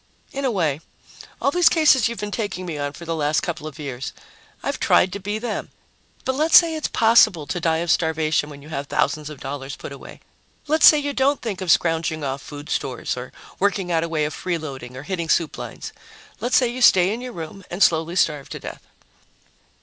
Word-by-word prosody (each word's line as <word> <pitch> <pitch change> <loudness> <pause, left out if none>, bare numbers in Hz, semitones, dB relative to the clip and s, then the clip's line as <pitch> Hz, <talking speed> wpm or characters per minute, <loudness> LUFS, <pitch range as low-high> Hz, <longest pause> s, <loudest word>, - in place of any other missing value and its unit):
"In 275 0 -3
a - - +2
way. 160 - 0 0.6
All 275 - +1
these 355 +2 +5
cases 300 -8 +4
you've 235 0 -5
been 210 0 -4
taking 205 -4 -3
me 170 -3 -4
on 145 0 -3
for 170 - -10
the 165 0 -2
last 150 -1 +1
couple 165 -3 -4
of 155 - -9
years 135 -4 -6 0.5
I've - - -2
tried 180 - +3
to 200 - -4
be 205 +2 -3
them. 235 +2 -4 0.6
But 260 - +1
let's 310 +4 +6
say 335 -2 +5
it's 310 -1 -2
possible 220 -8 +4
to 175 - -3
die 165 -2 +1
of 175 - +1
starvation 160 -2 +1
when 140 -1 -11
you 150 - -13
have 140 -2 -4
thousands 150 +1 0
of 150 -3 -10
dollars 135 0 -5
put - - -9
away. - - -11 0.4
Let's 310 +1 +5
say 305 - +8
you 285 -1 -2
don't 275 +2 +2
think 205 -5 -5
of 185 - -4
scrounging 160 -2 +2
off 135 0 -3
food 145 +1 -9
stores 130 -3 -2
or 125 0 -7 0.3
working 195 -2 0
out 165 -1 +2
a 170 - -3
way 155 -2 0
of 150 - -4
freeloading 140 -9 -5
or 130 - -7
hitting 170 0 -4
soup 165 -1 +1
lines. - - -7 0.5
Let's 245 - +2
say 250 - +3
you 245 +2 -5
stay 190 -4 +6
in 235 - -5
your 250 -1 -7
room 170 +4 -8
and 185 +3 +1
slowly 165 +1 +2
starve 150 -6 +1
to - - -6
death." - - -8
170 Hz, 220 wpm, -22 LUFS, 150-225 Hz, 0.6 s, say